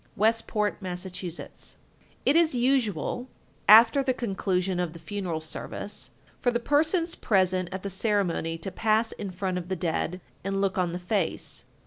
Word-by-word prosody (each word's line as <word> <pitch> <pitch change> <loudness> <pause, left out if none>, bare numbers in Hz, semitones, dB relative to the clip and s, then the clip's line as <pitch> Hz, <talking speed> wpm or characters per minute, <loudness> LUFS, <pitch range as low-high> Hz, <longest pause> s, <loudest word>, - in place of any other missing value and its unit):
Westport, 215 -1 +1
Mass. 180 0 -4
1248. 180 -2 -7 0.5
It 285 - +4
is 330 -4 +4
usual, 245 - +1 0.4
after 230 +5 +9
the 260 -2 0
conclusion 190 -5 -1
of 175 -3 -1
the - - -9
funeral 170 -1 -4
service, 200 +6 -6 0.3
for 245 - +2
the 240 0 +1
persons 320 +6 +2
present 185 - +1
at 190 0 -5
the 200 - -3
ceremony 190 -5 0
to 175 +4 -5
pass 220 +3 +2
in 200 - -5
front 185 0 -2
of 175 0 -9
the 190 - 0
dead, 175 +1 -1 0.2
and 195 +1 -1
look 195 -1 +1
on 175 -2 0
the - - -2
face. 180 -1 -2
195 Hz, 160 wpm, -27 LUFS, 180-225 Hz, 0.5 s, after